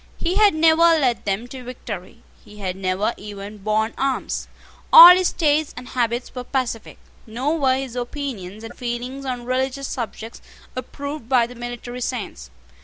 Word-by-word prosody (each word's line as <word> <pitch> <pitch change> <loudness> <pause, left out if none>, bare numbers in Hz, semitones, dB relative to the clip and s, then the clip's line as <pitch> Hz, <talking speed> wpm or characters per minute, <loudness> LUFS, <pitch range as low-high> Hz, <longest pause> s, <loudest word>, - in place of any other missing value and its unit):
He 355 +3 -1
had 420 -5 +5
never 320 0 +4
led 315 -8 +3
them 205 +4 -2
to 260 -1 -9
victory. 230 -7 -8 0.2
He 210 - -15
had 185 -3 -4
never 190 +4 -1
even 205 0 -9
borne 215 +2 0
arms. 270 -1 -2 0.4
All 350 +2 +12
his 370 -1 +1
tastes 305 -2 +1
and 250 0 -9
habits 240 -1 -2
were 250 - -5
pacific. 250 -4 -3 0.3
Nor 265 +9 -1
were 260 -2 +3
his 265 -3 -5
opinions 240 -6 -5
and 225 +1 -9
feelings 250 +2 -5
on 250 -2 -4
religious 260 +2 -1
subjects 225 -1 -6 0.3
approved 280 0 -6
by 250 -3 +4
the 240 - -10
military 240 0 -7
saints. 205 - -5
245 Hz, 160 wpm, -22 LUFS, 220-275 Hz, 0.4 s, All